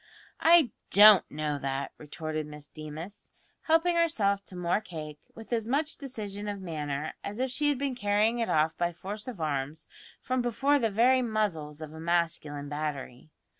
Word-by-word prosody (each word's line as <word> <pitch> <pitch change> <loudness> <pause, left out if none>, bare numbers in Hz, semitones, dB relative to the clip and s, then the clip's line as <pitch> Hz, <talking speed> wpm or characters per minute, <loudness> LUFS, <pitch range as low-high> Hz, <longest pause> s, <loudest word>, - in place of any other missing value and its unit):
"I 325 -7 +6 0.2
don't 210 -1 +8
know 150 -1 -2
that," 135 0 -3
retorted 155 0 -4
Miss 150 -1 -10
Deemas, 155 +6 -8 0.4
helping 330 +2 +3
herself 205 -13 +2
to 185 - -9
more 180 +3 0
cake 155 -6 -8 0.2
with 225 +2 -8
as 225 -2 0
much 295 +5 0
decision 210 -7 -6
of 205 -1 -3
manner 150 -4 -4
as 205 +1 -5
if 260 +1 -1
she 295 +3 +1
had 290 - +1
been 275 0 -1
carrying 215 +1 +1
it 230 - 0
off 155 +1 +2
by 175 0 0
force 205 +6 -6
of 240 -8 -6
arms 150 0 -2 0.3
from 255 0 -1
before 275 +5 +2
the 225 -3 +1
very 245 +5 +4
muzzles 170 -10 -2
of 155 0 -9
a 160 - -9
masculine 160 -4 -1
battery. 145 -2 -5
195 Hz, 170 wpm, -29 LUFS, 155-235 Hz, 0.4 s, don't